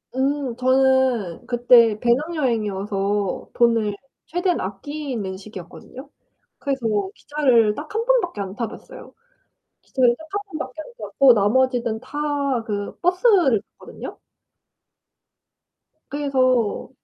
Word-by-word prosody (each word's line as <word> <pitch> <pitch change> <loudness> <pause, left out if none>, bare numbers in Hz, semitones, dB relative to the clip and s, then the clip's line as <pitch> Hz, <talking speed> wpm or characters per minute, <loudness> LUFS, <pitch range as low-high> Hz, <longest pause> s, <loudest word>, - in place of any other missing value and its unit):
음 270 -2 -1
저는 260 -7 +2
그때 240 -3 +5
배낭여행이어서 210 - -1
돈을 230 -4 +2 0.3
최대한 355 +1 0
아끼는 210 -1 -5
시기였거든요. 215 - -11 0.5
그래서 275 -4 -3 0.3
기차를 245 -8 +2
딱 300 +6 -8
1 455 +1 0
번밖에 430 - +1
안 195 0 -6
타봤어요. 250 - -8 0.7
기차를 245 -2 +2
딱 320 - -12
1 405 - -1 0.2
번밖에 260 +1 -6
안 - - -8
탔고 270 -3 +4
나머지는 235 +1 +1
다 260 +3 -11 0.5
그 205 -3 -4
버스를 360 - +3 0.2
탔거든요. - - -9 1.9
그래서 255 -6 +1
255 Hz, 235 characters per minute, -22 LUFS, 215-290 Hz, 1.9 s, 그때